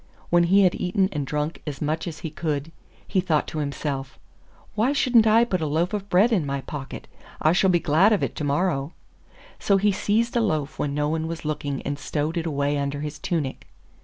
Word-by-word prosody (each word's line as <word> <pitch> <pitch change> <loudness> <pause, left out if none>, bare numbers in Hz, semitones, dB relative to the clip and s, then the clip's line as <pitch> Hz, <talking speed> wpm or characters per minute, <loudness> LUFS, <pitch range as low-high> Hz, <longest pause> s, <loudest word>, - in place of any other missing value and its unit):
When 175 0 +5
he 195 +3 +5
had 180 - +4
eaten 190 +1 0
and 145 -5 -3
drunk 150 +3 -2
as 140 -2 -4
much 155 +3 -2
as 165 -2 -7
he 160 - -5
could 155 -1 -3 0.4
he 190 - +1
thought 160 -5 +1
to 155 - -4
himself, 140 -2 -4 0.6
'Why 225 +6 +1
shouldn't 240 -5 +4
I 225 +2 +5
put 185 -7 -1
a 155 - 0
loaf 165 +6 0
of 205 -1 -4
bread 200 +7 +4
in 185 -7 +2
my 140 -1 -3
pocket? 135 -1 -7 0.3
I 155 - +3
shall 190 +1 +3
be 175 -1 +4
glad 165 +8 +4
of 210 - +2
it - - -1
to - - -3
morrow.' 145 0 0 0.7
So 200 - +3
he 205 +1 +3
seized 220 +4 0
a 235 - +3
loaf 155 -9 -1
when 140 -1 -1
no 150 0 0
one 160 +1 -1
was 165 -1 -6
looking 145 -2 -3
and 145 0 -3
stowed 150 +3 -2
it 170 -1 -2
away 145 -1 0
under 140 0 -2
his 150 0 -5
tunic. 150 -7 -3
160 Hz, 220 wpm, -24 LUFS, 145-190 Hz, 0.7 s, When